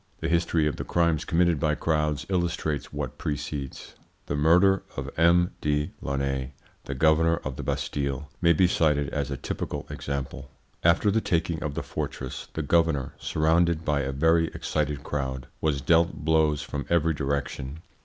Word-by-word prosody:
The 80 - -2
history 85 -2 +2
of 75 - -1
the - - -3
crimes 85 -3 +1
committed 85 -2 +2
by 75 -1 +1
crowds 75 -2 0
illustrates 85 -6 -1
what - - -5
precedes. 70 -2 -4 0.3
The - - -2
murder 90 +6 +4 0.2
of - - -4
M. 85 +2 +4
de 75 0 0
Launay, 70 -1 -2 0.3
the 70 - -4
governor 80 +4 +4
of 65 -1 -4
the - - -5
Bastille, 70 0 -2
may 85 - +5
be 90 +3 +4
cited 75 -5 +2
as 70 -1 -2
a 70 - -3
typical - - -4
example. 70 -1 -5 0.3
After 85 +5 +4
the 110 +2 +2
taking 85 -3 0
of 75 -2 -3
the - - -2
fortress 65 -1 -5
the 80 - -1
governor, 80 -3 +2
surrounded 80 +1 +2
by 75 -1 +1
a 70 -1 -2
very 80 +4 +3
excited 75 -2 -2
crowd, 65 -3 -3 0.2
was 75 -3 +1
dealt 85 +1 +2
blows 80 -2 +3
from 70 -2 -5
every 80 -1 +3
direction. 70 +1 -3
75 Hz, 165 wpm, -26 LUFS, 70-85 Hz, 0.3 s, may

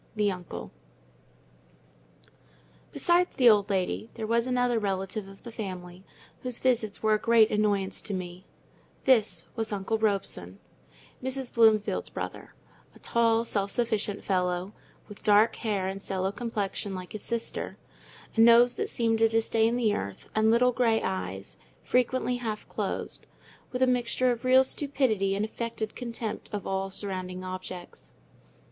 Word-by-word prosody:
THE 210 -2 +2
UNCLE 180 -2 -7 2.2
Besides 350 +1 +2
the 250 - +4
old 205 -1 +2
lady, 195 +3 -1
there 225 - -4
was 230 +2 +1
another 245 -2 +2
relative 195 0 -2
of 195 0 -14
the 235 - -8
family, 185 -4 -7 0.4
whose 250 -2 -2
visits 225 -6 0
were 215 0 +4
a 215 - +2
great 230 -1 +4
annoyance 205 -2 0
to 205 - -5
me—this 185 +3 -2
was 225 -2 -3
"Uncle 205 +2 -1
Robson," 195 - -1 0.7
Mrs. 260 -1 -2
Bloomfield's 220 -3 +3
brother; - - -7 0.4
a - - -14
tall, 230 0 +2
self 200 -3 -1
sufficient 215 -3 -1
fellow, 180 +1 -1 0.3
with 205 - -12
dark 215 +1 +4
hair 205 -5 -1
and 195 +1 -4
sallow 190 -1 -1
complexion 205 -3 -3
like 185 -1 -7
his 215 - -6
sister, 235 +1 -3 0.6
a - - -2
nose 235 +1 +7
that - - -3
seemed 225 -1 +1
to 225 - +6
disdain 225 +1 +2
the 230 -4 +2
earth, 100 - -5
and 220 0 +3
little 245 +2 +4
grey 230 -2 +2
eyes, 95 +1 -4 0.3
frequently 250 0 +1
half 220 -3 -4
closed, - - -4 0.4
with 250 0 +1
a - - +7
mixture 250 0 +1
of 240 +1 -4
real 260 +1 +6
stupidity 260 -9 +1
and 205 +2 0
affected 220 -1 -4
contempt 230 -3 -5
of 205 -3 -4
all 195 0 -1
surrounding 185 -2 -5
objects. 185 -1 -8
215 Hz, 145 wpm, -28 LUFS, 195-235 Hz, 2.2 s, nose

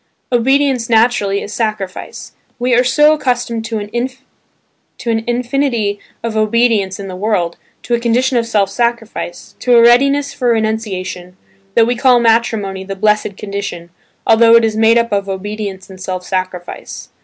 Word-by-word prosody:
Obedience 260 0 +2
naturally 220 -4 +2
is 210 - -7
sacrifice. 215 -5 -4 0.3
We 245 0 0
are 245 +1 +4
so 295 +5 +4
accustomed 245 -5 -1
to 225 0 -3
an 235 0 -6
infinity 240 -4 -1 0.2
of 230 -1 -3
obedience 215 -3 +1
in 195 - -6
the 185 - -7
world, 185 -4 -1 0.3
to 240 - -3
a 235 - +2
condi 235 +1 +1
tion 260 -1 +1
of 230 - -3
self 205 -4 +1
sacrifice, 230 -5 -3
to 245 -1 +3
a - - +7
readiness 275 +4 +4
for 250 - -2
renunciation, 190 -5 -3 0.4
that 230 - +5
we 245 +2 0
call 250 0 +4
matrimony 225 -4 +1
the 195 +1 -6
"blessed 210 0 0
condition," 200 -4 -6 0.3
although 230 +1 +6
it 230 -1 +5
is 220 -1 -1
made 225 +1 +4
up 235 0 +1
of 200 -1 -1
obedience 200 0 -5
and 190 -1 -13
self 185 -1 -4
sacrifice. 185 -1 -5
225 Hz, 155 wpm, -16 LUFS, 200-240 Hz, 0.4 s, a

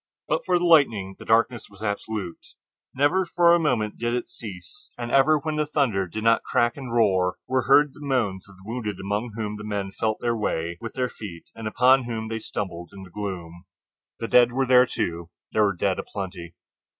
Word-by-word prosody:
But - - 0
for 180 -1 +4
the 175 - 0
lightning 115 - +4
the - - -10
darkness 115 +1 +2
was 100 +1 -13
absolute. 100 -3 -4 0.4
Never 145 +8 +3
for 170 -1 +4
a 175 - +5
moment 120 -9 0
did 120 0 0
it 125 - -3
cease, 115 - -9
and 120 0 -5
ever 145 +3 +5
when 155 +1 -3
the 150 -1 0
thunder 120 -11 +1
did 110 +5 -5
not 115 0 +4
crack 120 0 +1
and 130 -4 -7
roar 95 -6 +2
were 130 -1 0
heard 145 +1 +5
the - - -16
moans 105 -9 -1
of 100 - -15
the 95 - -18
wounded 110 -3 -4
among 105 +4 -3
whom 105 -2 -4
the 105 - -8
men 100 -2 -3
felt 110 +2 -1
their 120 -1 0
way 85 -5 -2
with 115 - -7
their 125 -1 0
feet, 95 -7 -10
and 115 -1 -6
upon 125 +3 +4
whom 110 -2 -4
they 115 0 -3
stumbled 85 -5 -5
in 95 -1 -10
the 90 - -13
gloom. 90 -3 -6 0.5
The 115 - -3
dead 120 0 +5
were 135 +2 +1
there, 125 0 +6
too—there 85 +5 -2
were 100 -2 0
dead - - 0
a - - -3
plenty. 90 -4 -7
110 Hz, 210 wpm, -25 LUFS, 95-130 Hz, 0.5 s, there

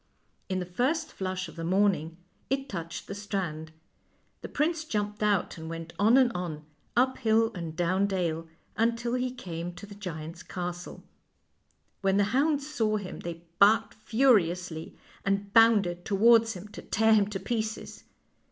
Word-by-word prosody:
In 185 - 0
the 180 - -2
first 270 - -1
flush 185 -1 -3
of - - -12
the 165 - -5
morning 180 -3 +1 0.3
it 270 0 -1
touched 165 -6 -6
the - - -6
strand. 185 -6 -4 0.7
The - - -7
prince 315 +2 0
jumped 210 -7 -3
out 205 -5 +1
and 160 0 -7
went 165 0 -7
on 220 +5 +6
and 255 -3 +5
on, 165 -5 -4 0.3
up 260 +1 +3
hill 225 0 +3
and 170 -3 -6
down 185 +3 +1
dale, 170 -4 -1 0.3
until 235 +1 0
he 255 0 0
came 175 -8 -6
to 205 - -9
the 205 - -11
giant's 170 -4 -7
castle. 175 -1 -6 1.0
When 195 0 +2
the 205 - +4
hounds 285 +1 +2
saw 220 -8 0
him 200 -3 -7
they 170 -1 -7 0.2
barked 215 +2 +5
furiously, 185 -9 +1 0.3
and 200 0 -1
bounded 205 -6 +5
towards 225 +3 +5
him 190 +3 -9
to - - -9
tear 220 +1 +3
him 205 -2 +4
to 205 -2 -4
pieces. 220 +2 -4
200 Hz, 160 wpm, -28 LUFS, 175-225 Hz, 1.0 s, on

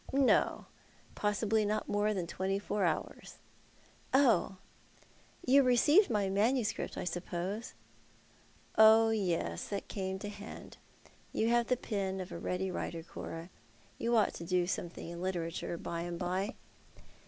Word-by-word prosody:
" - - -10
No. 270 -1 +3 0.5
Possibly 215 +1 +1
not 215 +1 -1
more 205 +1 +1
than 185 -4 -2
twenty 190 +3 -2
four 205 -1 -1
hours." 165 - -3 0.4
" - - -30
Oh! 215 -5 +2 0.9
You 275 +2 +6
received 285 - +5
my 210 -3 +1
manuscript, 215 +4 0
I - - -3
suppose? 180 +4 -4 0.3
" - - -30
" - - -29
Oh 220 +1 +8
yes, 170 - -1
that 200 -1 -4
came 190 -1 -3
to 205 +2 -6
hand. 205 +1 -10 0.5
You 225 - +1
have 240 0 +3
the 250 - +2
pen 195 -5 -2
of 185 - -6
a 170 - -5
ready 185 +1 -2
Avriter, 165 -2 -4
Cora. 165 +2 -7 0.5
You 235 +1 +1
ought 215 -3 +3
to - - -7
do 180 +1 +1
something 175 -2 -4
in 170 0 -7
literature, 170 -2 -3
by 170 0 -4
and 175 0 -4
by." 185 +6 -2
195 Hz, 155 wpm, -32 LUFS, 180-220 Hz, 0.9 s, Oh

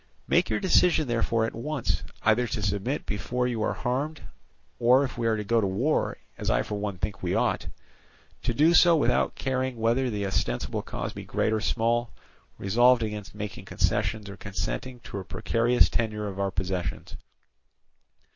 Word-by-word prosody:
Make - - +3
your 110 - 0
decision 180 -4 +3
therefore 115 -1 +1
at - - -4
once, 140 +3 -2 0.2
either 115 +3 +3
to 105 -1 -3
submit 100 +8 -1
before 125 +4 -2
you 120 -3 -2
are - - +1
harmed, 140 +5 -2 0.6
or 125 +3 +5
if 135 - -4
we 120 -1 -1
are 110 -1 +2
to 105 - -3
go 115 +2 +2
to 100 - +1
war, 120 +12 0 0.2
as - - -2
I - - +2
for - - -6
one 100 -2 -3
think 100 +2 -4
we 90 +1 -1
ought, - - 0 0.7
to 120 - -1
do 155 +6 +5
so 175 -1 +7
without - - +2
caring 130 -1 -2
whether 120 +3 +1
the 105 -3 -2
ostensible 95 - -1
cause - - -5
be - - -7
great 110 - 0
or 110 - 0
small, 120 +2 +1 0.5
resolved 120 +4 +4
against 105 -2 -5
making 105 -1 -6
concessions 105 -2 0
or 100 0 -8
consenting 120 +5 -4
to 100 - -6
a - - -6
precarious 115 +5 +2
tenure 105 -2 -1
of 100 -1 -6
our 100 0 +1
possessions. 95 -3 -3
115 Hz, 175 wpm, -27 LUFS, 105-125 Hz, 0.7 s, so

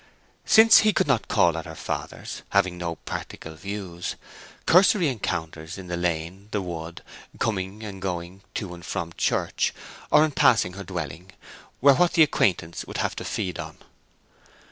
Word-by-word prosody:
Since 225 0 +8
he 215 -1 +3
could - - +2
not 135 -6 +1
call 85 -2 +3
at 80 - -5
her - - -8
father's, - - -5
having 95 -3 +2
no 85 -1 -3
practical 80 +1 -7
views, 90 0 -5 0.5
cursory 180 -1 +5
encounters 85 - -4
in 95 - -8
the 85 - -1
lane, 85 -1 -1
in 100 +2 -20
the 105 - -1
wood, 85 -2 -6 0.3
coming 100 -1 -2
and 100 -3 -7
going 90 0 -4
to 95 -5 -4
and 85 0 -11
from 85 0 -4
church, - - 0 0.3
or 155 - +6
in 155 - -3
passing 115 -9 +3
her 100 +1 -7
dwelling, 85 0 -6 0.5
were 140 +1 +8
what 175 +5 +3
the 165 - +7
acquaintance 90 - 0
would - - -6
have - - -1
to - - -4
feed 90 -3 -3
on. - - -7
95 Hz, 165 wpm, -25 LUFS, 85-110 Hz, 0.5 s, Since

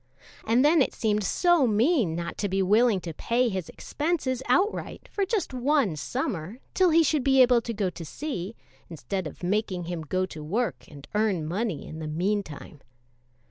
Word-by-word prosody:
And 240 +5 +4
then 310 +1 +5
it - - 0
seemed 210 -2 0
so 345 - +3
mean 225 - +2
not 170 0 -4
to 205 - -1
be 190 +1 +1
willing 215 +2 +4
to 165 -2 -6
pay 240 +9 +1
his 185 -5 -4
expenses 290 -5 -2
outright 375 - 0
for 395 -2 -1
just 400 - -1
one 255 - +1
summer, 195 - -3 0.2
till 370 -1 +4
he 330 0 +5
should 300 -2 +1
be 270 0 +4
able 245 -2 +6
to 230 - -5
go 200 -4 -1
to 170 - -8
sea, 210 - -5 0.3
instead 175 +2 -4
of 155 - -11
making 185 -1 -1
him 170 -1 -4
go 185 +4 -1
to 155 -4 -9
work 160 - -2
and 145 -2 -13
earn 210 -6 +1
money 185 -1 -2
in 160 - -8
the 155 - -5
mean 185 +7 0
time. 150 -4 -11
210 Hz, 185 wpm, -26 LUFS, 175-260 Hz, 0.3 s, able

